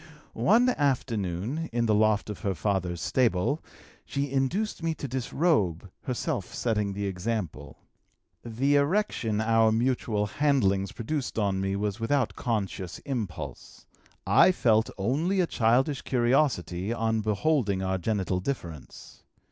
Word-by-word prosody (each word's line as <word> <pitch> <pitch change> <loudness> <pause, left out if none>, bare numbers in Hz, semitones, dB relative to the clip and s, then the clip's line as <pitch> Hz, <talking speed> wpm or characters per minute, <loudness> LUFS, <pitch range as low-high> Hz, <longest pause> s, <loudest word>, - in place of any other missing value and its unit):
One 235 +5 +4
afternoon, 125 - -1
in 120 0 0
the 110 - +2
loft 105 0 +2
of 105 - -8
her 100 -4 -2
father's 90 -1 -1
stable, 125 - +1 0.4
she 140 -1 -3
induced 170 +11 -1
me 165 -1 -1
to 145 - -5
disrobe, 120 - 0
herself 120 -6 -2
setting 105 -4 0
the 100 +1 -3
example. 90 -6 -4 0.7
The 130 +5 +1
erection 140 - +1
our 110 0 +3
mutual 115 -2 0
handlings 100 -6 +1
produced 135 +3 -4
on 100 -3 +1
me 95 0 -1
was 100 +1 -2
without 125 +2 0
conscious 100 -6 -3
impulse; 90 - -6 0.4
I 185 - +6
felt 110 -9 +2
only 150 - 0
a 180 - +4
childish 130 +2 +1
curiosity 120 - +1
on 110 -1 0
beholding 105 -2 +1
our 95 0 -1
genital 95 -2 -1
difference. 85 - -7
110 Hz, 125 wpm, -27 LUFS, 100-135 Hz, 0.7 s, I